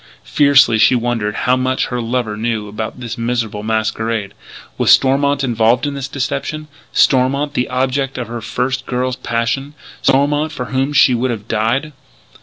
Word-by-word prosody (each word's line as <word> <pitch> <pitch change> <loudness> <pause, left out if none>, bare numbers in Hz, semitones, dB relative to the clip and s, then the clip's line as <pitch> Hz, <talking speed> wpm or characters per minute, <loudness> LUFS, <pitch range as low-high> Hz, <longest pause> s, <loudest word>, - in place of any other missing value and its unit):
Fiercely 140 -6 +4
she 125 - +5
wondered 115 -3 -1
how 125 - +4
much 130 0 0
her 125 -1 -2
lover 115 -2 -2
knew 110 -1 -2
about 110 +4 -6
this 120 -1 -6
miserable 115 -3 -2
masquerade. 110 -1 -2 0.5
Was - - +2
Stormont 140 +1 +4
involved 120 0 +2
in 145 - -2
this 135 -1 -4
deception 140 +2 -4 0.2
Stormont, 140 +2 +2
the 125 - -1
object 130 +1 -1
of 125 - -4
her 120 0 -6
first 125 +3 -2
girl's 125 0 -2
passion 130 +4 -2 0.3
Stormont, 145 +3 +2
for 125 - -5
whom 135 +2 -1
she 140 -3 +5
would 125 +2 0
have 110 -4 -5
died? 135 +8 -1
125 Hz, 160 wpm, -17 LUFS, 115-135 Hz, 0.5 s, she